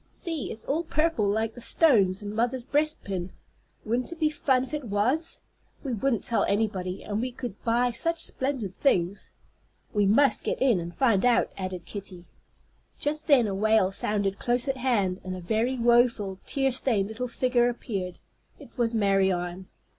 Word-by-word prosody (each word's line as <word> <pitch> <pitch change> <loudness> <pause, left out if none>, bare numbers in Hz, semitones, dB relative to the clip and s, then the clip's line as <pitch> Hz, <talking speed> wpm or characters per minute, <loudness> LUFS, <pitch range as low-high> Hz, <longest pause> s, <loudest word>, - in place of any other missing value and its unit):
See, 330 -5 -2
it's 220 - -6
all 305 +4 0
purple, 310 -9 +1
like 220 +2 0
the 245 - -11
stones 205 - +3
in 205 0 -5
mother's 240 +3 -1
breastpin. 250 - -1 0.6
Wouldn't 240 +6 -1
it 340 - -8
be 310 -2 +2
fun 265 -4 +1
if 265 - -9
it 295 -3 -3
was? 235 +11 0 0.4
We 270 -4 -3
wouldn't 235 +1 0
tell 235 - +1
anybody, 195 -3 -1
and 210 +1 -2
we 255 +1 -2
could 245 -4 -7
buy 240 +1 +2
such 330 +8 -1
splendid 260 - -2
things." 185 -6 0 0.6
"We 205 -2 +2
must 235 +3 +4
get - - -2
in 250 -8 +3
and 170 0 -5
find 225 -2 +2
out," 245 -1 +3
added 185 -2 -5
Kitty. 190 -4 -7 0.7
Just 300 +2 -2
then 275 -6 +5
a 200 - -2
wail 215 -1 +3
sounded 200 0 -1
close 245 +2 +2
at 270 -1 -1
hand, 205 -8 0
and 185 0 -5
a - - -6
very 220 +8 0
woful, 235 -5 +2
tear 270 -2 +1
stained 230 -6 +1
little 225 +4 -4
figure 245 0 +2
appeared. 195 -7 -4 0.4
It - - -15
was 235 -1 +1
Marianne. 190 -3 +1
230 Hz, 170 wpm, -27 LUFS, 195-260 Hz, 0.7 s, then